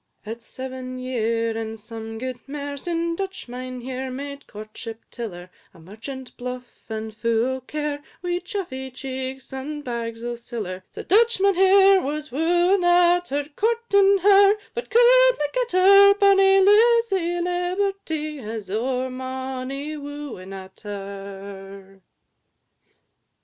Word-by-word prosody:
V. 215 - -5
It 235 +1 -7
's - - -14
seven 255 -1 -7
year, 230 -3 -1
and 225 0 -5
some 225 +1 -8
guid 255 +1 -5
mair, 285 0 -5
Syn 335 +3 -2
Dutch 385 -3 -5
Mynheer 255 +1 -5
made 280 +2 -7
courtship 215 +2 -9
till 235 -2 -5
her, 175 0 -11 0.2
A - - -15
merchant 225 - -9
bluff 250 0 -7
and 220 0 -5
fu' 230 +1 +1
o' 260 0 -2
care, 295 +2 -4 0.2
Wi' 355 0 -1
chuffy 340 -9 -5
cheeks, 265 0 -6
and 295 +3 -5
bags 230 -2 -4
o' 240 0 -2
siller; 220 -6 -6
So - - -8
Dutch 460 +2 +3
Mynheer 385 0 +5
was 300 0 -4
wooing 350 +6 +2
at 350 0 +4
her, 285 +1 -2
Courting 410 -3 +3
her, 400 0 +7 0.2
but 475 - -5
cudna - - +5
get - - -1
her; 395 +2 +7
Bonny 390 -1 +5
Lizzy 410 -4 +4
Liberty 355 -3 -2
has 220 -5 -6
ow'r 255 +4 -1
mony 260 +3 -5
wooing 285 -10 -8
at 190 -1 -10
her. 195 -1 -9
265 Hz, 135 wpm, -23 LUFS, 230-360 Hz, 0.2 s, her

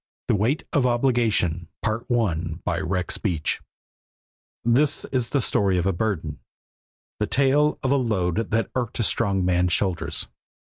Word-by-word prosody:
The - - +4
Weight 115 +9 +1
of 135 -3 +3
Obligation 120 -9 +1 0.2
By 110 -6 -1
Rex 90 0 -2
Beach 85 -8 -1 1.0
THIS 135 +6 +3
is 125 -3 0
the 140 - +1
story 100 -4 +2
of 90 - 0
a 95 - +2
burden, 85 -6 -2 0.8
the 105 - 0
tale 140 +3 +3
of 130 - +1
a 140 - +4
load 105 -4 0
that 115 +1 0
irked 125 -2 -2
a - - +2
strong 100 -4 +1
man's 90 -1 +2
shoulders. 85 -4 -1
110 Hz, 140 wpm, -24 LUFS, 90-120 Hz, 1.0 s, The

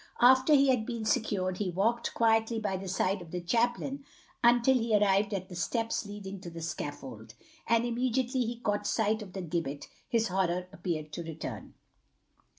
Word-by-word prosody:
After 260 +4 +6
he 275 -1 +5
had 250 -4 +3
been 230 -1 -4
secured 185 -4 0
he 200 -3 0
walked 225 +7 0
quietly 225 0 +3
by 210 -3 -1
the 190 +1 -5
side 185 +1 0
of 170 - -10
the 180 - -3
chaplain 240 +8 0 0.4
until 240 +2 +5
he 230 -4 +2
arrived 200 0 +3
at 190 -2 -3
the 180 - -9
steps 225 +6 -1
leading 200 -2 -7
to 175 - -7
the 165 0 -8
scaffold, 135 -7 -6 0.3
and 230 0 +3
immediately 250 +2 0
he 235 0 -4
caught 205 -2 -1
sight 220 0 +1
of 190 -3 -9
the 190 - -4
gibbet 155 -4 -3 0.2
his 230 -3 +1
horror 180 -1 0
appeared 155 -3 -4
to 170 - -4
return. 160 -2 -7
205 Hz, 175 wpm, -30 LUFS, 180-235 Hz, 0.4 s, After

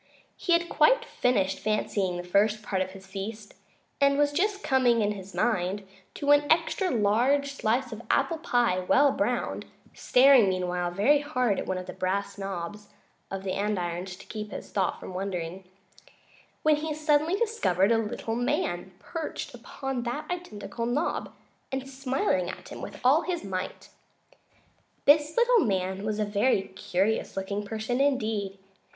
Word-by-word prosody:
He 350 - 0
had 340 0 +3
quite 475 +11 +4
finished 195 - 0
fancying 205 -3 -1
the 175 - -5
first 205 +4 +2
part 190 -2 -1
of 185 - -1
his 190 0 -12
feast, 205 +2 -7 0.5
and 280 0 +4
was 290 0 +3
just 400 +6 0
coming, 245 -4 +3
in 205 - +1
his 195 -1 -8
mind, 195 -3 0 0.3
to 285 0 +1
an 290 +1 +4
extra 340 +3 +2
large 250 +6 +2
slice 245 0 0
of 220 0 -7
apple 295 +4 +1
pie 240 - +2
well 275 +10 +4
browned - - -1 0.3
(staring 255 -5 +5
meanwhile 180 -1 -1
very 210 +12 +3
hard 255 -8 0
at - - -5
one 185 - -1
of 185 - -5
the - - -7
brass 200 +2 -2
knobs 195 +1 -5 0.4
of 195 0 -5
the 190 - -2
andirons 180 -3 -2
to - - -14
keep 210 -1 -6
his - - -8
thoughts 195 -2 0
from - - -8
wandering), 185 -1 -4 1.0
when 305 -1 +4
he 305 0 -3
suddenly 305 +3 +2
discovered 395 - +1
a 225 - +4
little 225 +1 -3
man 190 -6 -1
perched 325 - -6
upon 270 -2 -5
that 245 +5 -3
identical 235 - -5
knob, 280 +7 -1 0.4
and 265 0 -3
smiling 270 +6 -1
at - - -8
him - - -8
with - - -8
all 275 +6 +5
his 355 -2 -3
might. 185 -2 -5 1.2
This 295 +4 +4
little 480 0 +5
man 190 -1 -1
was 215 0 -1
a 215 - 0
very 205 0 +2
curious 190 +3 -1
looking 200 +2 -2
person 220 +5 -2
indeed. 220 -8 0
220 Hz, 160 wpm, -27 LUFS, 195-280 Hz, 1.2 s, staring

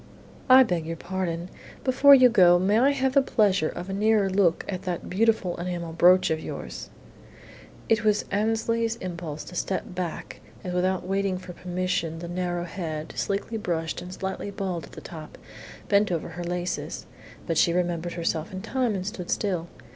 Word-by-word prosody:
"I 260 +1 +9
beg 175 -8 -2
your 165 - -3
pardon! 175 -1 -4 0.3
Before 275 +2 +7
you 255 -1 +7
go, 180 -7 +6
may 200 +5 +3
I 265 +3 +5
have 265 -2 0
the 275 - +6
pleasure 200 -10 +2
of 175 +1 -7
a 195 - -4
nearer 205 -1 +2
look 185 -4 +2
at 185 -2 -4
that 180 -3 -4
beautiful 210 -3 +2
enamel 175 -1 -4
brooch 180 +2 +5
of 160 - 0
yours?" 60 - -7 1.0
It 225 -1 +2
was 210 -1 +2
Annesley's 225 +2 0
impulse 170 -7 -6
to - - -11
step 185 +1 -3
back 180 -2 -5 0.2
as 180 - -4
without 180 0 0
waiting 195 -1 0
for 180 -1 -9
permission 180 -2 -2
the 170 +1 -6
narrow 175 0 -2
head, 160 -3 -5
sleekly 200 +3 -2
brushed 165 -5 -2
and 180 - -8
slightly 190 +2 -4
bald 190 -4 -4
at - - -17
the - - -9
top, 155 -2 -10 0.5
bent 200 -1 +3
over 165 -3 -2
her 175 - -6
laces. 175 +1 -3 0.4
But 165 -3 0
she 170 - +4
remembered 175 -1 -1
herself 165 -2 -2
in 190 0 -6
time 245 -2 0
and 185 -1 -3
stood 190 -4 -5
still. 180 -5 -1
185 Hz, 175 wpm, -26 LUFS, 175-205 Hz, 1.0 s, I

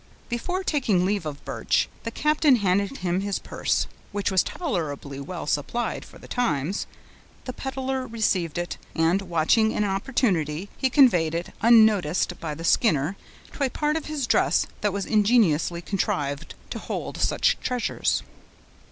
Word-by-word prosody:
Before 360 +11 -2
taking 225 - +1
leave 200 -4 -1
of 145 -1 -7
Birch, - - 0 0.2
the - - -1
captain 300 +2 +3
handed 200 +3 +1
him 180 +1 -1
his 200 -1 -1
purse, - - -1 0.3
which 205 -1 -1
was 190 - +4
tolerably 150 - -4
well 165 +5 -6
supplied 150 +12 -2
for - - -15
the - - -13
times; 175 - -1 0.6
the 255 - -4
peddler 265 0 -3
received 190 -8 0
it, 175 0 -3 0.2
and, 165 +4 +2
watching 190 +5 +2
an 210 - +1
opportunity, 195 - 0
he 265 - +1
conveyed 180 - +4
it, 170 +1 -4
unnoticed 210 -7 +4
by 155 -3 -4
the 165 - -8
Skinner, 165 - +2 0.4
to 285 - -2
a 265 - +2
part 300 +3 0
of 320 - -3
his 300 -4 -2
dress 230 - +3 0.2
that 210 - +1
was 195 0 -3
ingeniously 200 -7 +2
contrived 145 -8 -2 0.2
to - - -4
hold - - -5
such - - +2
treasures. 250 -2 -1
200 Hz, 150 wpm, -25 LUFS, 170-245 Hz, 0.6 s, was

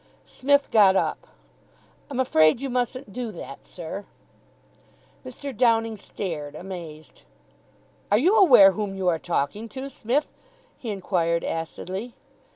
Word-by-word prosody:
Psmith 285 +2 +1
got 200 -3 +6
up. - - -1 0.8
"I'm 270 -2 -4
afraid 155 -8 +4
you 270 -1 -4
mustn't 250 -2 -2
do 245 -2 -4
that, 140 -5 -10
sir." 180 +3 -7 1.2
Mr. 260 +1 -7
Downing 225 -1 +2
stared, 160 -8 -6
amazed. 165 -6 -9 0.9
"Are 205 - +6
you 350 - +3
aware 260 - +8
whom 200 -1 -4
you 190 -1 -2
are 165 -2 0
talking 175 +7 -2
to, 270 +3 -7
Smith?" 255 +5 0 0.5
he 235 - -6
inquired 175 -4 0
acidly. 185 +7 -5
210 Hz, 125 wpm, -25 LUFS, 175-250 Hz, 1.2 s, aware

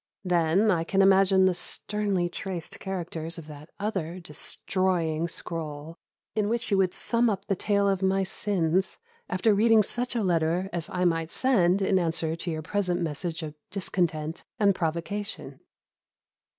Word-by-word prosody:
Then 180 +3 +3
I 165 -3 +1
can 195 +3 +2
imagine 190 0 +5
the 185 - +4
sternly 195 +1 0
traced 175 -1 -4
characters 170 -3 -4
of 165 - -8
that 150 +1 -11
other 190 -4 -3
destroying 170 0 -1
scroll, 160 -2 -5 0.4
in 210 -1 0
which 230 -1 -2
you 195 - +3
would 185 -2 +1
sum 235 0 +2
up 195 -2 -3
the 195 - 0
tale 200 +1 +1
of 195 -1 +1
my 190 0 +2
sins, 190 -2 0 0.3
after 195 +4 +2
reading 220 +1 +5
such 245 +4 -1
a 230 - +1
letter 175 +1 +1
as 170 -2 -2
I 180 0 -1
might 165 -2 +1
send 195 -7 +3
in 190 0 +3
answer 165 -1 -1
to 170 +1 -5
your 155 -1 -3
present 180 -1 0
message 165 0 -3
of 150 -1 -6 0.2
discontent 170 -4 -1
and 200 -2 +4
provocation. 180 +5 -4
180 Hz, 155 wpm, -27 LUFS, 165-200 Hz, 0.4 s, imagine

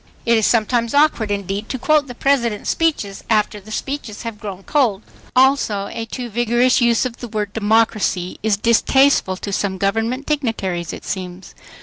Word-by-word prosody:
It 235 -1 +4
is 220 -2 +3
sometimes 235 +2 +1
awkward 285 -7 +3
indeed 200 +1 -3
to 260 - -2
quote 295 +3 +2
the 245 - -8
President's 235 -6 +1
speeches 290 -12 -1
after 210 -1 +1
the 205 +2 -15
speeches 245 -2 -5
have 230 -3 -6
"grown 200 -3 -7
cold." 230 -8 +1 0.3
Also 255 -6 +2
a 225 0 -5
too 245 +1 -5
vigorous 240 +3 +2
use 235 +1 +3
of 240 -2 -4
the 240 - -7
word 210 -2 -3
"democracy" 215 -4 +1
is 215 -2 +1
distasteful 235 -2 +3
to 200 +1 -5
some 190 -1 -1
government 225 +7 -1
dignitaries, 220 - -2
it - - -9
seems. 185 -1 -6
225 Hz, 165 wpm, -19 LUFS, 200-250 Hz, 0.3 s, It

